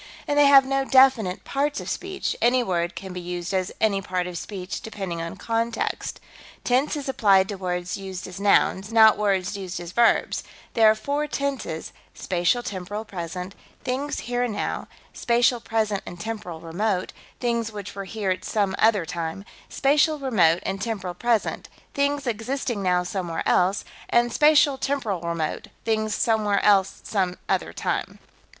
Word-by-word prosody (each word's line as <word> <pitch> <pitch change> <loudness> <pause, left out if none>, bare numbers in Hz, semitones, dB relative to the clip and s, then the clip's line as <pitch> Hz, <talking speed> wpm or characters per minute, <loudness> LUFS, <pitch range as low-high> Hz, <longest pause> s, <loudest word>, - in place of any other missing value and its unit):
And 290 - 0
they 290 -1 +6
have 275 -1 +8
no 270 0 +1
definite 260 -8 +4
parts 290 +1 -1
of - - -7
speech; 380 +1 -3
any 245 +2 +4
word 175 -4 -1
can 190 -2 -7
be 180 - -5
used 175 +1 -4
as 185 -1 0
any 205 -3 +2
part 185 -1 -2
of 180 -1 -6
speech, 185 +1 -5
depending 195 -6 -5
on 165 0 -6
context. 230 0 -2 0.4
Tense 260 +5 +1
is 285 -2 -5
applied 200 -7 +4
to 205 - -3
words 180 -1 -3
used 190 -2 -6
as 185 0 -8
nouns, 200 0 +2
not 220 -1 +7
words 200 -1 0
used 190 -2 -5
as 175 -1 -7
verbs; 235 +4 +2 0.3
there 220 -1 +6
are 215 - +4
four 285 +7 -2
tenses 275 - -3 0.2
spatial 180 +7 0
temporal 205 +2 -5
present, 180 -1 -6 0.3
things 270 +4 -2
here 245 0 -2
and 240 -4 -1
now; - - -3 0.3
spatial 240 +1 +2
present 215 -3 -1
and 175 - -8
temporal 205 -6 -5
remote, 185 +3 -2 0.3
things 235 -2 -1
which 205 -1 -7
were 195 0 -6
here 200 -1 -2
at 185 - -2
some 200 -3 0
other 215 -5 +4
time; 170 +4 -4 0.2
spatial 295 +3 +3
remote 185 - +3
and 195 0 -3
temporal 195 -5 -3
present, 230 +3 -1 0.2
things 285 0 0
existing 240 0 -2
now 180 -1 +2
somewhere 180 -2 -3
else, 185 +3 +2 0.2
and 240 0 +3
spatial 295 -2 +5
temporal 245 -11 -1
remote, 170 -2 -3 0.2
things 215 -1 0
somewhere 215 -3 +2
else 195 -2 +3
some 185 -3 -1
other - - 0
time." - - -3
210 Hz, 165 wpm, -24 LUFS, 185-245 Hz, 0.4 s, have